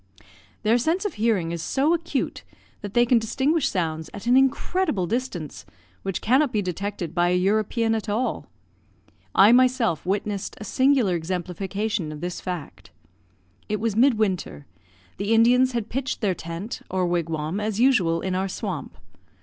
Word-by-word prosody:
Their 225 +3 +3
sense 330 - 0
of 410 - -1
hearing 210 -7 0
is 170 -1 -4
so 280 - +1
acute 335 -5 -2 0.4
that 205 -1 -7
they 240 0 +5
can 240 0 +4
distinguish 275 +6 +1
sounds 160 -3 -2
at 205 - -8
an 245 +1 +4
incredible 270 - +1
distance, 200 - -4 0.4
which 195 -2 -3
cannot 260 +4 +3
be 215 - 0
detected 185 -2 -4
by 175 -1 +2
a 180 - +2
European 215 +4 +1
at 220 -1 -3
all. 225 +5 -1 0.9
I 200 +3 +7
myself 245 - +3
witnessed 200 +1 -2
a - - -6
singular 260 -2 +2
exemplification 180 +2 -3
of 150 - -7
this 175 +2 -5
fact. 180 -5 -6 0.8
It 210 0 -1
was 220 -1 -1
mid 250 +2 +5
winter; 190 -8 -2 0.5
the 200 +3 0
Indians 250 +3 +4
had 230 -3 -2
pitched 265 +2 -3
their 200 -4 +2
tent, 170 +6 -6
or 185 -1 0
wigwam, 165 0 -1
as 215 0 -2
usual, 190 -11 +3
in 190 - -2
our 190 +1 0
swamp. 185 -4 -5
210 Hz, 160 wpm, -24 LUFS, 180-245 Hz, 0.9 s, I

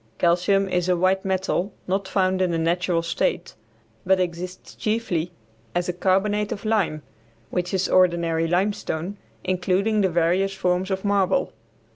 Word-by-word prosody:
Calcium 180 +3 +2
is 180 -1 0
a 180 - +3
white 185 +2 +2
metal 190 0 -1 0.2
not 190 +1 -1
found 185 -1 +1
in 185 - +2
the 170 - 0
natural 170 +1 +1
state, 170 - -1 0.5
but 190 0 +3
exists 180 +1 -4
chiefly 190 -7 -1 0.4
as 175 0 0
a 180 - -1
carbonate 205 +3 +1
of 200 - -5
lime, 195 -9 0 0.5
which 180 0 -1
is 190 -1 +1
ordinary 170 -3 +2
limestone, 180 0 -1 0.3
including 185 +4 +1
the 190 - +3
various 180 +3 +1
forms 180 0 0
of 190 +1 -2
marble. 200 +6 +1
185 Hz, 145 wpm, -24 LUFS, 175-195 Hz, 0.5 s, a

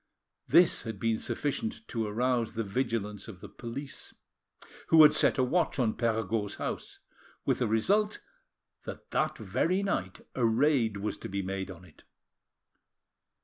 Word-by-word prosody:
This 170 +3 +5
had 110 -4 -6
been 115 0 0
sufficient 225 - -3
to 115 -3 -2
arouse 120 +2 0
the 115 0 -2
vigilance 105 -1 -2
of 100 -5 -10
the - - -9
police, 135 +4 -6 0.7
who 160 -1 +8
had 150 - +8
set - - +4
a 130 - +3
watch 165 +7 +1
on 115 -5 +2
Perregaud's 110 -3 -1
house, - - -5 0.5
with - - +1
the 125 - +1
result 200 - +2 0.7
that - - -8
that - - 0
very 185 +3 0
night 95 - -2
a 125 - -1
raid 115 -2 +3
was 105 +2 -3
to - - -7
be 100 0 -2
made 95 +1 -4
on 90 -1 -10
it. 80 - -20
115 Hz, 150 wpm, -30 LUFS, 105-140 Hz, 0.7 s, who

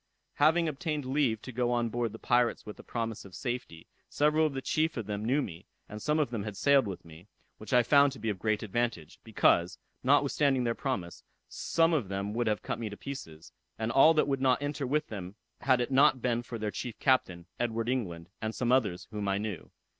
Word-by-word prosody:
Having 160 +3 +4
obtained 150 -1 -3
leave 130 -5 0
to 130 - -7
go 120 0 0
on 120 -1 +1
board 120 -1 -2
the 110 - -9
pirates 120 +1 +1
with 105 - -9
a - - -10
promise 115 -2 -4
of 95 -2 -12
safety, 120 -10 -5 0.2
several 150 +2 +3
of 150 - -5
the - - -1
chief 155 -1 0
of 115 - -3
them 105 0 -4
knew 135 +6 +1
me, 85 -3 -9 0.2
and 105 +1 -8
some 150 +1 +1
of 150 -6 +1
them 115 -4 -2
had 100 -1 -6
sailed 140 -4 +4
with 95 -4 -7
me, 85 +3 -14 0.3
which 110 - -9
I 125 -1 +5
found 140 +3 +5
to 135 - -11
be 115 - -2
of 95 - -6
great 110 +1 0
advantage; 110 -7 -3
because, 90 -5 +2 0.2
notwithstanding 135 -4 +3
their 115 -1 +1
promise, 95 - -4 0.2
some 165 0 +1
of 135 -11 0
them 100 +2 -3
would 120 0 -1
have 105 -1 0
cut - - -3
me 115 -2 -3
to 105 - -9
pieces, 80 - -9 0.2
and 110 +1 -2
all 155 +7 +6
that 150 - +3
would 135 -2 -1
not 130 -1 +3
enter 145 -1 -3
with 150 +3 0
them, 95 -2 -7 0.2
had 130 0 +3
it 120 +2 -1
not 135 0 +5
been 120 -1 0
for 120 0 -7
their 105 -1 -3
chief 120 +1 -6
captain, 95 -11 +1
Edward 115 -1 -1
England, 90 -10 -2
and 110 0 -3
some 125 -1 0
others 100 -9 +1
whom 105 -2 -3
I 100 0 +1
knew. 105 -4 -5
120 Hz, 225 wpm, -30 LUFS, 105-135 Hz, 0.3 s, all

